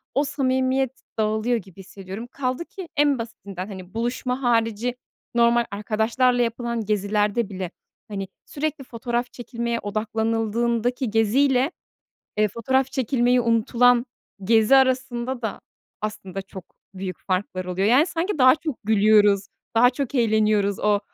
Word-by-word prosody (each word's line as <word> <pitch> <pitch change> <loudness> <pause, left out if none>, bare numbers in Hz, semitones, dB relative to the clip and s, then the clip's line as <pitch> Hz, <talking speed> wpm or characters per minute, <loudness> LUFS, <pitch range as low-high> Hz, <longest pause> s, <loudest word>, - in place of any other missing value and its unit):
o 280 - +3
samimiyet 265 -2 0 0.2
dağılıyor 220 +2 +1
gibi 190 -3 -11
hissediyorum. 195 +3 -8
Kaldı 260 +4 -2
ki 375 -4 -9
en 285 -3 +3
basitinden, 200 -5 -7
hani, 190 -2 -9
buluşma 250 +2 -2
harici 230 0 +1 0.4
normal 235 0 +4
arkadaşlarla 225 +5 +1
yapılan 235 -1 -2
gezilerde 210 +1 0
bile, 185 -3 -5 0.4
hani, 195 -3 -5 0.2
sürekli 300 0 -3
fotoğraf 240 0 -3
çekilmeye 235 -1 -3
odaklanıldığındaki 225 +3 -1
geziyle, 255 +6 +3 0.7
eee, 210 0 +3
fotoğraf 260 +5 0
çekilmeyi 250 -1 +2
unutulan 235 +2 +3 0.4
gezi 225 +4 +5
arasında 255 -1 +1
da 220 - -3 0.4
aslında 195 -2 -5
çok 190 -2 -10 0.3
büyük 185 -2 -5
farklar 185 -1 -2
oluyor. 180 +2 -1
Yani, 270 +8 +5
sanki 345 +1 -2
daha 255 -1 +7
çok 310 -4 -4
gülüyoruz, 205 -2 +4 0.3
daha 245 +2 +6
çok 275 +1 -4
eğleniyoruz 215 -4 +2
o 210 -1 +2
230 Hz, 125 wpm, -23 LUFS, 210-255 Hz, 0.7 s, daha